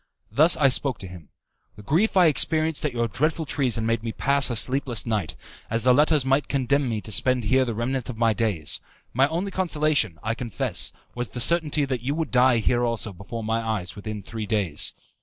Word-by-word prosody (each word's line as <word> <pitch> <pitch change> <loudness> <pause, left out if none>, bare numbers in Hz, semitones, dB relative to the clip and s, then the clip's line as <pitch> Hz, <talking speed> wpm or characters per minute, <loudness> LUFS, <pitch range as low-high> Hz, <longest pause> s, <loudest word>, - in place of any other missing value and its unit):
Thus 160 +4 +4
I 140 - +4
spoke 130 -2 +1
to 95 - -8
him: 90 -4 -12 0.5
"The 105 - -13
grief 180 - +1
I 180 - +6
experienced 160 0 +2
at 150 - 0
your 120 -1 -1
dreadful 155 +7 -1
treason 130 -5 -1
made 115 0 0
me 115 0 -4
pass 140 +3 +2
a 120 - -2
sleepless 130 0 +3
night, 105 -8 -2 0.3
as 115 0 0
the 125 0 +5
letters 150 0 +3
might 135 +2 +1
condemn 140 0 0
me 110 -2 -2
to 110 - -10
spend 125 +4 +2
here 130 +5 +2
the 115 -3 -4
remnant 125 +2 -2
of 120 - -6
my 115 -1 +2
days. 100 -11 -1 0.3
My 135 +3 +3
only 175 +6 -3
consolation, 155 - 0
I 110 - -1
confess, 115 -3 -3 0.2
was 120 -2 -4
the 120 - -7
certainty 150 +1 +2
that 130 -3 -3
you 140 +4 -2
would 160 0 -3
die 125 -1 +4
here 120 +2 +1
also 115 -3 -1
before 110 +5 -7
my 110 +1 -1
eyes 110 -6 -4
within 105 0 -7
three 110 -2 -6
days. 100 -8 0
125 Hz, 210 wpm, -24 LUFS, 110-140 Hz, 0.5 s, I